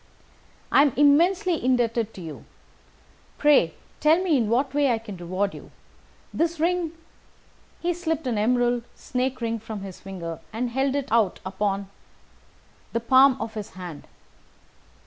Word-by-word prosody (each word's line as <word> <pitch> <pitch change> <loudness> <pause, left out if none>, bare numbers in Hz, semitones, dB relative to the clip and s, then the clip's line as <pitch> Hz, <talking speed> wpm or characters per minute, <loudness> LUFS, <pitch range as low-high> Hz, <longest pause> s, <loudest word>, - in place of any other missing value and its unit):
"I - - +6
am 285 -4 +3
immensely 340 - +4
indebted 235 -3 +1
to 185 - -8
you. 160 -3 -9 0.9
Pray 280 - +4 0.2
tell 310 +3 +4
me 345 -5 +2
in 230 -5 +1
what 260 +4 +1
way 285 -2 +3
I 230 - +2
can 220 -3 -8
reward 185 +3 -2
you. - - -11 0.6
This 335 0 0
ring 340 0 0 0.4
" - - -33
He 350 +1 +1
slipped 325 -3 -2
an 235 -4 0
emerald 245 +2 +2
snake 255 +1 -2
ring 230 -1 -1
from 220 -2 -7
his 195 -2 -8
finger 175 -4 -6
and 235 +2 -2
held 265 +2 0
it 280 -2 -3
out 220 -5 +2
upon 195 +1 -2 1.1
the 230 - +1
palm 260 +3 +5
of 225 +1 -4
his 210 -2 -7
hand. 175 -5 -8
245 Hz, 150 wpm, -25 LUFS, 205-285 Hz, 1.1 s, I